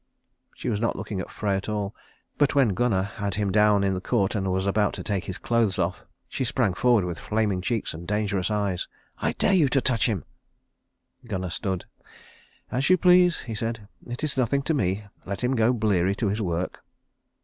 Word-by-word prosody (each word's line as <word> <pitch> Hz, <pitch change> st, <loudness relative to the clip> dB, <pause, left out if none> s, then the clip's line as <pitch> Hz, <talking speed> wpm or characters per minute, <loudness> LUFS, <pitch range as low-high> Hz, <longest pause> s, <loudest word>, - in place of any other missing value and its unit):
She -, -, -6 dB
was 110 Hz, -4 st, 0 dB
not 115 Hz, -, 0 dB
looking 95 Hz, -3 st, -4 dB
at -, -, -7 dB
Frey 100 Hz, -2 st, -1 dB
at 95 Hz, +2 st, -3 dB
all; 105 Hz, -1 st, -2 dB, 0.5 s
but 145 Hz, 0 st, +3 dB
when 135 Hz, -5 st, +5 dB
Gunnar 95 Hz, -1 st, +1 dB
had 100 Hz, -1 st, -4 dB
him 100 Hz, -1 st, 0 dB
down 105 Hz, 0 st, +4 dB
in 95 Hz, -1 st, +2 dB
the 90 Hz, -, -3 dB
court 100 Hz, -2 st, +1 dB
and 95 Hz, -3 st, -1 dB
was 95 Hz, +1 st, 0 dB
about 105 Hz, +1 st, +2 dB
to -, -, -6 dB
take 95 Hz, -5 st, -2 dB
his 95 Hz, -, -4 dB
clothes 115 Hz, -5 st, +1 dB
off, -, -, -1 dB, 0.2 s
she -, -, -3 dB
sprang 120 Hz, -5 st, +1 dB
forward 115 Hz, 0 st, +3 dB
with 85 Hz, -2 st, -4 dB
flaming 105 Hz, -4 st, 0 dB
cheeks 115 Hz, +3 st, -1 dB
and 85 Hz, +2 st, -8 dB
dangerous 105 Hz, -2 st, 0 dB
eyes. 100 Hz, -4 st, -1 dB, 0.3 s
"I -, -, 0 dB
dare -, -, +2 dB
you 160 Hz, -7 st, +4 dB
to 135 Hz, -, +3 dB
touch 120 Hz, -3 st, +2 dB
him." 105 Hz, -7 st, -2 dB, 1.0 s
Gunnar 95 Hz, -5 st, -3 dB
stood. 95 Hz, 0 st, -2 dB, 0.9 s
"As 130 Hz, +5 st, +1 dB
you 185 Hz, -, +6 dB
please," 180 Hz, -1 st, +5 dB
he 115 Hz, -, -6 dB
said. 115 Hz, -1 st, -4 dB, 0.2 s
"It 120 Hz, +4 st, -6 dB
is 150 Hz, -3 st, -1 dB
nothing 135 Hz, +2 st, +1 dB
to 160 Hz, -, 0 dB
me. 100 Hz, -, 0 dB, 0.2 s
Let 100 Hz, +4 st, -4 dB
him 125 Hz, +2 st, +2 dB
go 115 Hz, 0 st, +4 dB
bleary 100 Hz, -5 st, +1 dB
to 110 Hz, -2 st, 0 dB
his 105 Hz, +3 st, -1 dB
work." 90 Hz, -2 st, -3 dB
105 Hz, 205 wpm, -26 LUFS, 95-120 Hz, 1.0 s, you